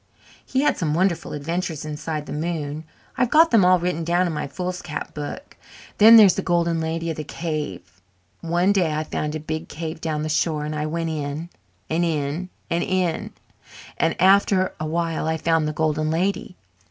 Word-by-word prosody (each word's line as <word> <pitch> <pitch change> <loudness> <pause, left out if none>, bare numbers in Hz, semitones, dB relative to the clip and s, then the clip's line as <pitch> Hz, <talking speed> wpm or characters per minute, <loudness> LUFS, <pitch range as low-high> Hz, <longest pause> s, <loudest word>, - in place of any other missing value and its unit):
He 265 - 0
had 295 - +1
some 155 -3 0
wonderful 180 -1 0
adventures 160 +1 -3
inside 150 0 -4
the - - -6
moon 155 -1 -3 0.3
I've 250 - +3
got 325 +4 +5
them 225 -5 +5
all 185 0 +6
written 175 -1 -2
down 175 +2 +2
in 170 - -2
my 150 - -3
foolscap 180 0 -5
book. 150 - -7 0.4
Then 225 +2 +10
there 215 - +10
is 190 - +5
the - - -2
Golden 170 -2 +1
Lady 165 +1 -2
of 160 - -6
the 155 - -3
Cave. 95 - -5 0.4
One 175 +3 +1
day 180 -6 +2
I 155 - -1
found 150 0 -3
a - - -3
big 155 +1 -5
cave 160 +1 -6
down 155 -2 -2
the - - -2
shore 155 -1 0
and 150 - -3
I 150 0 -2
went 165 +1 -2
in 150 +2 -4 0.4
and 165 +2 0
in 160 +2 -2 0.2
and 170 +1 0
in 185 -3 -1 0.6
and 165 - 0
after 190 0 +4
a 155 - -3
while 165 -1 -1
I 160 0 0
found 165 -1 +1
the - - -1
Golden 155 0 0
Lady. 180 +2 -1
165 Hz, 190 wpm, -23 LUFS, 155-180 Hz, 0.6 s, Then